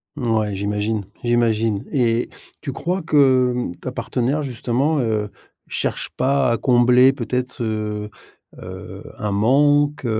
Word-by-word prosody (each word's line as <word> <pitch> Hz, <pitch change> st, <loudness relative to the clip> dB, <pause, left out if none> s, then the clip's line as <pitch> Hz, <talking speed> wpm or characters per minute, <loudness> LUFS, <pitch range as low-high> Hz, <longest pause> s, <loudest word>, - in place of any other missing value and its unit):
Mouais, 110 Hz, -4 st, 0 dB
j'imagine, 105 Hz, +1 st, -2 dB, 0.2 s
j'imagine 115 Hz, -2 st, +1 dB
et 120 Hz, -4 st, +1 dB, 0.3 s
tu 140 Hz, -, -4 dB
crois 180 Hz, +3 st, -2 dB
que, 130 Hz, -5 st, +4 dB
hem, 120 Hz, -8 st, -3 dB
ta 130 Hz, -, -6 dB
partenaire, 130 Hz, +3 st, -1 dB
justement, 135 Hz, +3 st, -1 dB
heu, 110 Hz, -3 st, -1 dB, 0.4 s
cherche -, -, -3 dB
pas 135 Hz, 0 st, +2 dB
à 115 Hz, -, +1 dB
combler 125 Hz, +1 st, +5 dB
peut-être, 125 Hz, 0 st, -3 dB
heu, 105 Hz, -1 st, -3 dB, 0.5 s
heu, -, -, -9 dB
un 105 Hz, -, -3 dB
manque, 145 Hz, +7 st, +2 dB
120 Hz, 125 wpm, -21 LUFS, 110-135 Hz, 0.5 s, combler